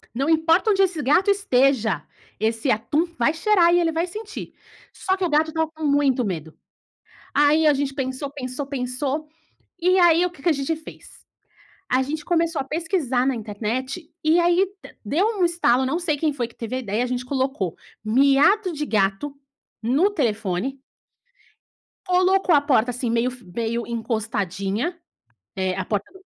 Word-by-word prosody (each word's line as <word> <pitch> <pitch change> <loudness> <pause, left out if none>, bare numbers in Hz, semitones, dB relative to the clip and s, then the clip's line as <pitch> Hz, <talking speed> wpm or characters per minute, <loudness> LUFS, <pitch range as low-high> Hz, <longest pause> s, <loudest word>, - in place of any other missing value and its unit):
"Não 275 +5 0
importa 325 +6 +3
onde 390 -1 +2
esse 365 -5 +1
gato 350 +10 +3
esteja, 260 - +2 0.4
esse 225 +4 0
atum 275 +9 +1
vai 270 +6 +3
cheirar 345 0 +3
e 350 - +5
ele 330 -1 +1
vai 330 +2 -1
sentir.", 425 +4 -8 0.4
só 380 0 -1
que 375 - -1
o - - -1
gato 310 +1 +2
estava 320 0 -1
com 320 0 -10
muito 280 -3 +2
medo. 160 -5 -5 0.8
Aí 295 +2 +4
a 300 - +6
gente 275 0 -2
pensou, 265 0 -3
pensou, 270 0 -5
pensou, 270 +3 -3 0.5
e 365 +2 +3
aí 345 -1 +5
o - - -4
que 315 -6 -17
que - - +1
a - - +5
gente 280 +2 -1
fez? 315 - -14 0.7
A 255 +1 +3
gente 300 +3 -4
começou 335 -3 +1
a - - -3
pesquisar 300 -4 -1
na 270 - +1
internet, 240 - -4
e 320 +3 +4
aí 350 +2 +3 0.2
de - - -13
deu 310 - +1
um - - +4
estalo, 300 -7 +2
não 280 +6 0
sei 335 -4 -1
quem 305 +1 0
foi 245 -4 -3
que 235 - -21
teve 230 +2 -4
a - - -1
ideia, 225 +1 -1
a - - -1
gente 250 0 -3
colocou 260 - -2 0.3
"miado 280 - +4
de 300 -1 -3
gato" 215 +7 0 0.5
no 275 - +2
telefone 235 - -2 1.3
colocou 365 0 +3
a 290 - +5
porta, 250 -4 +2
assim, 245 0 -3
meio 235 +2 +1
f 250 -1 -14
meio 230 +5 -3
encostadinha, 220 - -2 0.6
eh, 190 -1 -1
a 190 - -2
porta 205 0 -2
do 380 - -16
275 Hz, 175 wpm, -23 LUFS, 235-330 Hz, 1.3 s, a